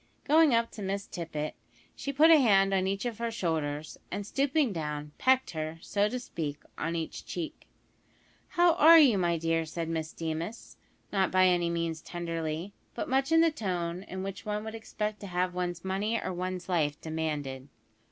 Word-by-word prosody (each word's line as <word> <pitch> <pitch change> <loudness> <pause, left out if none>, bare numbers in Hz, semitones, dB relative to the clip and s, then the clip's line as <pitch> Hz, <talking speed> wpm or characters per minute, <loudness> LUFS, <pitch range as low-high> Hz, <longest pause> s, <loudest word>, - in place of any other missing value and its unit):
Going 310 0 +5
up 230 0 +1
to 215 - -9
Miss 200 +1 -2
Tippet, 155 -3 -4 0.4
she 280 - -4
put 305 +4 +6
a 320 - +9
hand 195 -6 +4
on 190 -1 +2
each 195 +3 -2
of 235 -3 -3
her 235 0 -1
shoulders, 155 -7 -2
and 205 - -4
stooping 275 +1 +1
down, 150 -2 -4
pecked 260 -3 +3
her, 155 0 -4
so 205 +4 0
to 250 - -3
speak, 150 - -4 0.2
on 165 +1 -2
each 165 -1 -4
cheek. 170 -3 -6 0.9
"How 345 -1 +6
are 330 +2 +9
you, 260 -11 +6
my 170 -2 +1
dear?" 165 0 +1
said 165 +1 -4
Miss 160 -1 -2
Deemas, 165 +6 -5 0.4
not 190 -2 +2
by 185 0 +4
any 175 -2 +3
means 165 -2 -2
tenderly; 165 +1 -4 0.2
but - - -3
much 270 +3 +1
in 325 0 +6
the 330 -1 +4
tone 180 - -3
in 190 0 -5
which 195 0 -6
one 210 0 -3
would 220 0 -6
expect 215 -1 -4
to 200 - -7
have 180 0 -1
one's 175 -1 -3
money 205 +4 0
or 185 - -3
one's 180 0 -4
life 155 -5 0
demanded. 150 -4 -3
185 Hz, 185 wpm, -29 LUFS, 165-220 Hz, 0.9 s, a